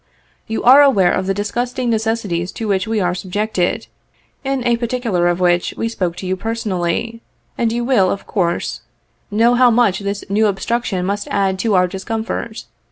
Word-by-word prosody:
You 225 - -3
are 265 +4 +8
aware 200 -11 +4
of 185 - -1
the 195 - +1
disgusting 240 +4 -2
necessities 215 -6 -1
to 225 - -4
which 195 -1 0
we 220 -1 0
are 180 -2 +1
subjected, 190 +3 -2 0.6
in 270 -2 -2
a 240 -1 +3
particular 235 -7 0
of 175 0 0
which 175 -1 +1
we 230 - -1
spoke 180 -7 -2
to 190 - -7
you 185 +1 0
personally, 225 +1 -2 0.3
and 230 -1 0
you 240 +1 -1
will, 225 -8 +3
of 200 - -3
course, 175 -4 -1 0.5
know 230 +3 +3
how 250 0 +5
much 225 -5 +3
this 200 0 -4
new 215 +2 +2
obstruction 200 -1 -1
must 200 +2 -2
add 195 -2 0
to 210 +1 +1
our 180 0 +4
discomfort. 220 +4 -4
210 Hz, 175 wpm, -18 LUFS, 185-230 Hz, 0.6 s, are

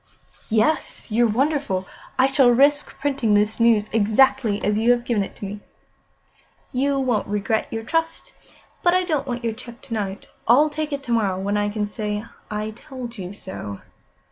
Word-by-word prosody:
"Yes. 225 +2 0
You're 235 +2 +4
wonderful. 255 -5 0 0.3
I 260 - +5
shall 270 -2 +5
risk 285 +4 +3
printing 265 -7 +1
the 210 +1 +2
news 230 -3 +4
exactly 220 0 +3
as 210 - +2
you 230 +2 +2
have 245 0 +3
given 225 -5 +1
it - - -9
to - - -7
me." 205 +1 -6 1.1
"You 275 +2 +1
won't 245 -6 0
regret 210 +2 0
your 225 0 -3
trust. 325 +6 -2 0.5
But 350 0 +4
I 370 - +3
don't 305 -6 -1
want 245 -1 -3
your 230 -1 0
cheque 235 +2 -11
to 230 - -8
night. 200 -3 -3 0.2
I'll 290 +6 +5
take 305 0 -3
it 280 -1 -3
to 245 - -5
morrow, 200 -5 +1
when 200 +2 -1
I 205 0 +1
can 210 0 -1
say: 210 0 -3 0.3
'I 215 +1 -3
told 240 0 -9
you 180 -1 -5
so. 145 - -8
230 Hz, 180 wpm, -23 LUFS, 210-270 Hz, 1.1 s, I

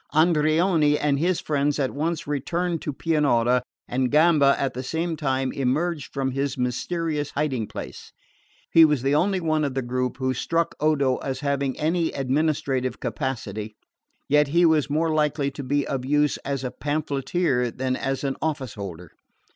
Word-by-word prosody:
Andreoni 155 -1 +3
and 145 -2 +1
his 175 +2 +1
friends 145 -1 0
at 135 -3 0
once 160 +3 -2
returned 165 +4 -2
to 150 - -3
Pianura, 130 -6 +2 0.3
and 130 +1 0
Gamba 150 -2 +5
at 135 - -1
the 125 - -4
same 165 +5 -2
time 135 -3 -1
emerged 145 +4 -1
from 135 -1 -1
his 135 +1 -2
mysterious 145 +4 -2
hiding 135 -7 -1
place. - - -8 0.6
He 165 - +8
was 150 -5 +3
the 135 +1 +2
only 185 +5 +2
one 155 -2 0
of 140 -3 -2
the 135 - -1
group 125 +1 -2
who 130 -1 0
struck 165 +6 -1
Odo 140 -4 +2
as 135 0 -4
having 140 -2 -1
any 165 +2 +1
administrative 135 -2 0
capacity; 110 -6 -4 0.5
yet 150 0 +4
he 170 +5 +3
was 155 -3 +3
more 160 +2 +1
likely 150 -2 +1
to 140 - -7
be 140 +2 0
of 135 -2 -3
use 150 +2 +2
as 140 -1 -4
a 125 - -3
pamphleteer 145 -2 -1
than 130 +2 -2
as 135 +1 -2
an 135 -1 -2
office 150 -6 -2
holder. 90 -5 -8
145 Hz, 165 wpm, -24 LUFS, 130-155 Hz, 0.6 s, He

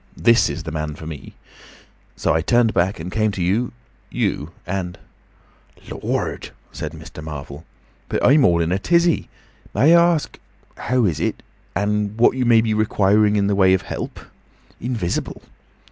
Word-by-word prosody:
This 115 0 +4
is 85 - -5
the 80 - -6
man 75 -1 -4
for 80 - -10
me.' 80 -3 -9 0.8
So - - 0
I 80 - +1
turned 120 +5 +2
back 90 +2 0
and 85 +3 -6
came 110 +1 +1
to 95 - -2
you—you. 105 -6 -3 0.2
And—" 90 -1 -4 0.9
"Lord!" - - -3 0.2
said 75 0 -6
Mr. 80 -1 -10
Marvel. 75 0 -8 0.4
"But - - 0
I'm 140 +2 +6
all 85 -1 +4
in 85 +1 0
a 95 - +1
tizzy. 170 - +2 0.5
May 160 +5 +5
I 170 0 +5
ask—How 130 -4 -4
is 85 -7 0
it? - - -2 0.3
And 105 +2 -1
what 120 +2 +4
you 130 -1 0
may 115 -1 +5
be 110 -1 0
requiring 105 0 +2
in 100 -1 +2
the 100 - +1
way 95 -1 +4
of 95 - -3
help?—Invisible!" 115 -7 -6
100 Hz, 155 wpm, -21 LUFS, 85-115 Hz, 0.9 s, I'm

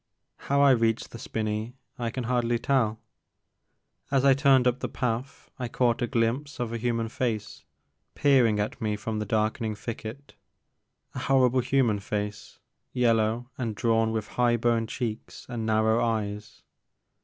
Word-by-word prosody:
How 140 +1 +3
I 140 -1 +7
reached 115 -2 +1
the 115 - -9
spinney 110 +2 -3 0.2
I 120 -1 -1
can 125 +2 -4
hardly 120 0 +1
tell. 115 -4 +1 1.1
As 135 -1 +2
I 135 - +7
turned 135 -2 +4
up 125 0 +2
the - - -3
path 125 +1 -4
I 125 - -2
caught 120 0 +1
a 120 - +1
glimpse 130 +4 -1
of 120 -2 -2
a 115 - -3
human 115 -1 -1
face 110 -3 -3 0.5
peer 135 -4 +4
ing 105 -1 0
at 105 - -3
me 105 -1 0
from 110 +1 -4
the 105 - -3
darkening 110 +1 0
thicket, 115 +5 -7 0.4
— - - -49
a - - -5
horrible 130 -2 +3
human 125 -5 +2
face, 105 +1 -5 0.3
yellow 115 0 +1
and 115 -4 -2
drawn 115 0 +2
with 110 -2 -2
high 120 -1 +2
boned 115 -1 +1
cheeks 115 -3 -5
and 115 -2 -4
narrow 110 +1 +3
eyes. 105 -1 -3
115 Hz, 160 wpm, -27 LUFS, 110-125 Hz, 1.1 s, I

